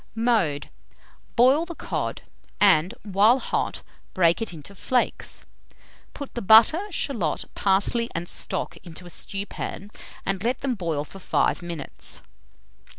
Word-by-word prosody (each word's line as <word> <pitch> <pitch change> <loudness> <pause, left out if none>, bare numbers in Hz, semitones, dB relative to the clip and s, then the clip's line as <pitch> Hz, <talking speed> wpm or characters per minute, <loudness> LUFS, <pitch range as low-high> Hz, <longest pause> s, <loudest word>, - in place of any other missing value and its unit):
Mode. 220 -11 +1 0.6
Boil 260 +6 +5
the 340 0 -7
cod, - - -3 0.4
and 190 0 +5
while 210 +4 +4
hot, - - -2 0.3
break 170 +1 +4
it 225 - -3
into 165 +3 -9
flakes; 250 +6 -1 0.7
put 285 -2 -7
the 240 - -4
butter, 225 - +6
shalot, 225 - -1
parsley, 205 +4 +2
and 170 +1 -3
stock - - -2
into 175 0 -10
a 175 - -9
stewpan, 200 +1 -5 0.3
and 195 0 -1
let 245 +2 0
them 270 -2 0
boil 165 -8 -2
for 195 - -12
5 180 - +1
minutes. 170 -5 -5
200 Hz, 130 wpm, -25 LUFS, 175-240 Hz, 0.7 s, butter